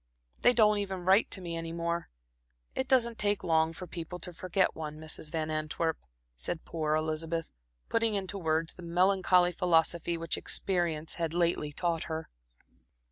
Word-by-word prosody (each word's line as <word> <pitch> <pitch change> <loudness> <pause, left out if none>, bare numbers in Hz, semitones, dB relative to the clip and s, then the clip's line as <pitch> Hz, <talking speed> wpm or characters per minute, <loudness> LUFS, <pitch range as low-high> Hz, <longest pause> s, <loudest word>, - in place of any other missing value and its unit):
They 245 - +7
don't 210 -3 +4
even 190 -3 -4
write 190 +3 +5
to 190 - 0
me 170 -2 -4
any 165 0 -4
more. 170 0 -2 0.6
It 260 - -1
doesn't 235 -4 +3
take 205 -1 +2
long 160 -1 +3
for 175 +3 -8
people 175 0 -6
to 180 0 -5
forget 185 +2 +1
one, 155 -1 -5
Mrs. 155 0 -4
Van 155 -1 -2
Antwerp," 155 +1 -1 0.4
said 110 - -3
poor 155 -2 -1
Elizabeth, 160 +1 -2 0.4
putting 230 -2 +2
into 195 0 -2
words 160 -1 0
the - - -12
melancholy 180 +1 +3
philosophy 170 -1 +2
which 165 -1 -1
experience 170 -4 0
had 165 0 -1
lately 170 -3 +1
taught 165 +1 -1
her. 160 0 -5
170 Hz, 160 wpm, -30 LUFS, 160-185 Hz, 0.6 s, They